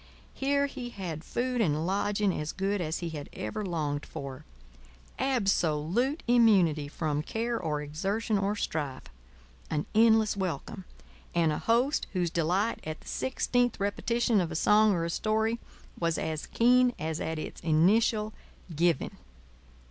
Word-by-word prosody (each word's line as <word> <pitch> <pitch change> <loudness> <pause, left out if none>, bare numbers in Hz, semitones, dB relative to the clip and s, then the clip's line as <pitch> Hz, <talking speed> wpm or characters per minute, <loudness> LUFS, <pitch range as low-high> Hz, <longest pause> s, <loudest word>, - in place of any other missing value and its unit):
Here 280 +1 +1
he 255 -3 -6
had 175 -8 -6
food 245 +4 -1
and 155 -5 +1
lodging 200 +1 +1
as 150 -1 -3
good 195 +1 -1
as 160 0 -2
he - - -2
had 150 -3 -7
ever 110 - -4
longed 150 -6 -2
for; 135 -1 -8 0.7
absolute 210 - +1
immunity 195 -11 +4
from 150 0 -2
care 230 +7 -2
or 150 -3 -2
exertion 195 +9 -1
or 200 +1 0
strife; 145 -9 -3 0.7
an 150 0 -1
endless 220 -1 +5
welcome, 190 +1 -4 0.5
and 165 -2 +3
a 150 - -2
host 245 +6 +1
whose 175 -3 0
delight 180 +7 +1
at 155 0 -6
the - - -17
sixteenth 245 -2 0
repetition 220 +2 +1
of 170 -2 -3
a - - -4
song 210 +5 +5
or 170 -3 0
a - - -2
story 220 +4 0 0.4
was 165 -2 0
as 160 -1 -3
keen 250 +1 +4
as 160 0 -3
at 160 0 -2
its 155 - -6
initial 210 +7 +3 0.4
giving. 170 -1 +1
195 Hz, 145 wpm, -29 LUFS, 160-225 Hz, 0.7 s, endless